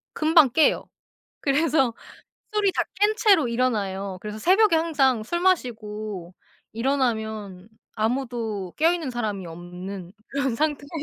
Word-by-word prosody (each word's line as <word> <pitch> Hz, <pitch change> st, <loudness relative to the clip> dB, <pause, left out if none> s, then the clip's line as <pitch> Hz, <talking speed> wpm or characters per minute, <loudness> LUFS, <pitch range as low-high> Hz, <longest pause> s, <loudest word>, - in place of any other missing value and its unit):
금방 315 Hz, -3 st, +5 dB
깨요. 315 Hz, +5 st, +2 dB, 0.5 s
그래서 275 Hz, -3 st, +2 dB, 0.6 s
술이 410 Hz, -2 st, +2 dB
다 -, -, +1 dB
깬 415 Hz, +2 st, +2 dB
채로 390 Hz, -, +4 dB
일어나요. 200 Hz, -6 st, -1 dB
그래서 210 Hz, +1 st, -6 dB
새벽에 380 Hz, -, +4 dB
항상 280 Hz, -8 st, +2 dB
술 345 Hz, +8 st, -2 dB
마시고 215 Hz, -, -1 dB, 0.4 s
일어나면 220 Hz, -6 st, -2 dB, 0.3 s
아무도 225 Hz, -5 st, -2 dB
깨어있는 325 Hz, -2 st, +1 dB
사람이 215 Hz, -6 st, -3 dB
없는 180 Hz, +2 st, -8 dB, 0.2 s
그런 275 Hz, -3 st, -1 dB
상태에서 290 Hz, +1 st, -1 dB
240 Hz, 280 characters per minute, -24 LUFS, 210-310 Hz, 0.6 s, 금방